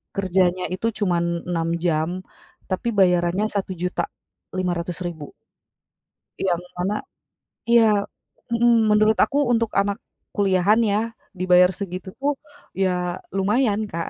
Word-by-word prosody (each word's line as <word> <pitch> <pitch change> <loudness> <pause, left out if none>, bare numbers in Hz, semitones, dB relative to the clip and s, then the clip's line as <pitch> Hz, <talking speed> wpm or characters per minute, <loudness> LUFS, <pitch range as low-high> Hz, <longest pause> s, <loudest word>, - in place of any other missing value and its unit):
kerjanya 185 -1 +1
itu 225 +5 -1
cuman 175 -4 +1 0.3
6 165 -1 -1
jam 160 -1 +1 0.6
tapi 190 +5 -1
bayarannya 180 +1 +3
Rp1.500.000 180 -3 -4 1.1
Yang 175 -2 0 0.2
mana 190 +4 -1 0.7
iya, 235 -1 +6 0.7
mhm, 235 -1 +4
menurut 215 +1 +4
aku 285 - +3
untuk 230 -1 +1
anak 200 +2 +1 0.4
kuliahan 200 +2 +3
ya 205 0 +2 0.4
dibayar 180 0 +5
segitu 190 -1 -5
pun 290 +1 +1 0.4
ya 180 -2 -1 0.2
lumayan, 210 +2 +1
Kak. 165 0 -3
185 Hz, 100 wpm, -23 LUFS, 180-210 Hz, 1.1 s, iya